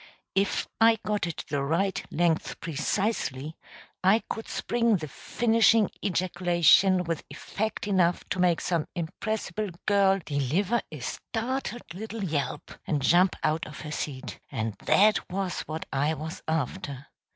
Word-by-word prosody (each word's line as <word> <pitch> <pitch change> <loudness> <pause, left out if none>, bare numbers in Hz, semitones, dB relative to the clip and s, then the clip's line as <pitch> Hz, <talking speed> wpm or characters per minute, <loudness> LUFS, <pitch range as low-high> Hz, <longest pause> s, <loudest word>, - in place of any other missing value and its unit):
If 195 +1 +1
I 225 0 +6
got 210 -5 0
it 170 - -5
the 140 -2 -1
right 170 +7 0
length 170 -1 0
precisely, 155 - -2 0.5
I 205 +5 +4
could 225 - -4
spring 235 -3 +1
the 155 -3 -6
finishing 225 - +3
ejaculation 180 0 +4
with 165 -3 -3
effect 210 +9 -4
enough 180 -3 +2
to 185 - -2
make 180 -2 +3
some 170 -4 0
impressible 215 +5 -3 0.2
girl 195 -1 +4
deliver 165 - +1
a 155 - -7
startled 240 - -4
little 220 +3 -5
yelp 145 -4 -2 0.2
and 150 - +1
jump 175 +7 +4
out 155 +1 0
of 150 - -9
her 150 - -6
seat 140 -3 -5
and 110 -5 -2
that 210 +1 +4
was 190 0 -2
what 155 +1 -4
I 145 +4 +1
was 160 +2 -6
after. 145 -2 -2
175 Hz, 140 wpm, -27 LUFS, 155-205 Hz, 0.5 s, I